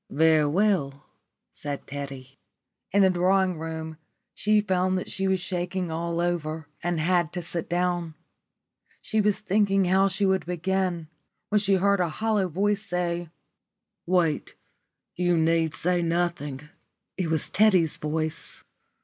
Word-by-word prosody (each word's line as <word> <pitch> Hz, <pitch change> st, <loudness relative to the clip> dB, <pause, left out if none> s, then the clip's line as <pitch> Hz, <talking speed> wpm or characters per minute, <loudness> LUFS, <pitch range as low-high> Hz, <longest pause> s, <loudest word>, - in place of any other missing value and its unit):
"Very 160 Hz, -3 st, +4 dB
well," 155 Hz, -5 st, +1 dB, 0.5 s
said 145 Hz, -1 st, -6 dB
Teddy. 135 Hz, -1 st, -8 dB, 0.5 s
In 200 Hz, +1 st, +4 dB
the 190 Hz, -, +5 dB
drawing 185 Hz, -1 st, +2 dB
room 160 Hz, -1 st, -5 dB, 0.4 s
she 210 Hz, 0 st, +2 dB
found 185 Hz, -2 st, +1 dB
that 185 Hz, -, -5 dB
she 195 Hz, 0 st, -1 dB
was 190 Hz, -1 st, +2 dB
shaking 180 Hz, -1 st, -3 dB
all 170 Hz, +1 st, -2 dB
over 160 Hz, -3 st, -2 dB
and 175 Hz, -1 st, -1 dB
had 175 Hz, 0 st, +1 dB
to 175 Hz, -1 st, -4 dB
sit 170 Hz, 0 st, -5 dB
down. 175 Hz, -2 st, -1 dB, 0.8 s
She 220 Hz, -, 0 dB
was 210 Hz, -1 st, +1 dB
thinking 195 Hz, -1 st, +2 dB
how 190 Hz, +2 st, +4 dB
she 195 Hz, +2 st, 0 dB
would 190 Hz, -2 st, +1 dB
begin, 180 Hz, -1 st, -1 dB, 0.4 s
when 210 Hz, -, +3 dB
she 200 Hz, -1 st, +2 dB
heard 200 Hz, +1 st, +2 dB
a 175 Hz, -2 st, +1 dB
hollow 210 Hz, +2 st, 0 dB
voice 200 Hz, +4 st, 0 dB
say, 175 Hz, -3 st, -2 dB, 0.8 s
"Wait. 170 Hz, -4 st, +1 dB, 0.6 s
You 175 Hz, -1 st, +2 dB
need 160 Hz, -1 st, +2 dB
say 180 Hz, +1 st, +1 dB
nothing." 165 Hz, -5 st, -2 dB, 0.5 s
It 185 Hz, -3 st, -2 dB
was 160 Hz, -2 st, 0 dB
Teddy's 185 Hz, -6 st, +4 dB
voice. 155 Hz, +1 st, -1 dB
175 Hz, 140 wpm, -26 LUFS, 160-190 Hz, 0.8 s, the